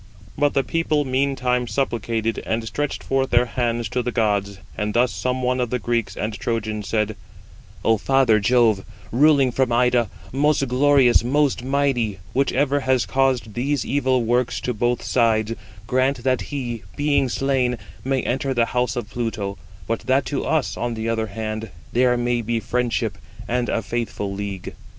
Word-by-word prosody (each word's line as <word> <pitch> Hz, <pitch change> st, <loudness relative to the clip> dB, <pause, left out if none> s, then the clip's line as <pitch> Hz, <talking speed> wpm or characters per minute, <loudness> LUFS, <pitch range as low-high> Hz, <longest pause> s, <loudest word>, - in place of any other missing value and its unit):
But 145 Hz, 0 st, +1 dB
the 135 Hz, -, +3 dB
people 155 Hz, -2 st, 0 dB
meantime 130 Hz, -2 st, 0 dB
supplicated, 115 Hz, -1 st, -1 dB
and 110 Hz, 0 st, -2 dB
stretched 145 Hz, +6 st, -3 dB
forth 135 Hz, 0 st, 0 dB
their 120 Hz, +1 st, +4 dB
hands 120 Hz, -1 st, -1 dB
to 125 Hz, -, 0 dB
the 125 Hz, 0 st, -2 dB
gods; 100 Hz, -3 st, 0 dB, 0.2 s
and 105 Hz, +1 st, -2 dB
thus 120 Hz, +1 st, +3 dB
some 130 Hz, 0 st, -2 dB
one 125 Hz, +1 st, +1 dB
of 125 Hz, -2 st, 0 dB
the 125 Hz, -, 0 dB
Greeks 115 Hz, -4 st, -2 dB
and 110 Hz, +1 st, -2 dB
Trojans 110 Hz, -1 st, -3 dB
said: 110 Hz, -1 st, 0 dB, 0.7 s
"O 115 Hz, 0 st, +4 dB
father 130 Hz, -3 st, +3 dB
Jove, 110 Hz, -2 st, +3 dB, 0.3 s
ruling 140 Hz, 0 st, +4 dB
from 130 Hz, 0 st, +1 dB
Ida, 120 Hz, -1 st, +3 dB, 0.2 s
most 140 Hz, +1 st, +2 dB
glorious, 130 Hz, -1 st, +4 dB
most 140 Hz, 0 st, +1 dB
mighty, 130 Hz, -6 st, 0 dB, 0.2 s
whichever 140 Hz, +1 st, +2 dB
has 130 Hz, -2 st, +1 dB
caused 130 Hz, -5 st, +1 dB
these 135 Hz, +3 st, -1 dB
evil 130 Hz, -3 st, +1 dB
works 120 Hz, +1 st, +1 dB
to 125 Hz, -, -1 dB
both 120 Hz, +2 st, 0 dB
sides, 115 Hz, -2 st, +2 dB, 0.3 s
grant 130 Hz, +1 st, +1 dB
that 130 Hz, -1 st, +1 dB
he, 120 Hz, -5 st, -4 dB
being 145 Hz, -2 st, +2 dB
slain, 130 Hz, -2 st, 0 dB, 0.3 s
may 135 Hz, -1 st, 0 dB
enter 135 Hz, +2 st, -1 dB
the 120 Hz, -1 st, +3 dB
house 125 Hz, +2 st, +1 dB
of 120 Hz, -2 st, -5 dB
Pluto, 110 Hz, -4 st, -3 dB, 0.3 s
but 115 Hz, 0 st, -1 dB
that 130 Hz, +1 st, +3 dB
to 140 Hz, -, -2 dB
us, 160 Hz, -4 st, 0 dB
on 120 Hz, -1 st, -2 dB
the 110 Hz, 0 st, -3 dB
other 110 Hz, -1 st, 0 dB
hand, 110 Hz, +1 st, -4 dB, 0.2 s
there 125 Hz, 0 st, +3 dB
may 120 Hz, 0 st, 0 dB
be 115 Hz, +1 st, -1 dB
friendship 115 Hz, 0 st, -1 dB, 0.3 s
and 120 Hz, 0 st, 0 dB
a 115 Hz, -, 0 dB
faithful 115 Hz, -4 st, -3 dB
league." 100 Hz, -1 st, -5 dB
120 Hz, 165 wpm, -22 LUFS, 115-135 Hz, 0.7 s, their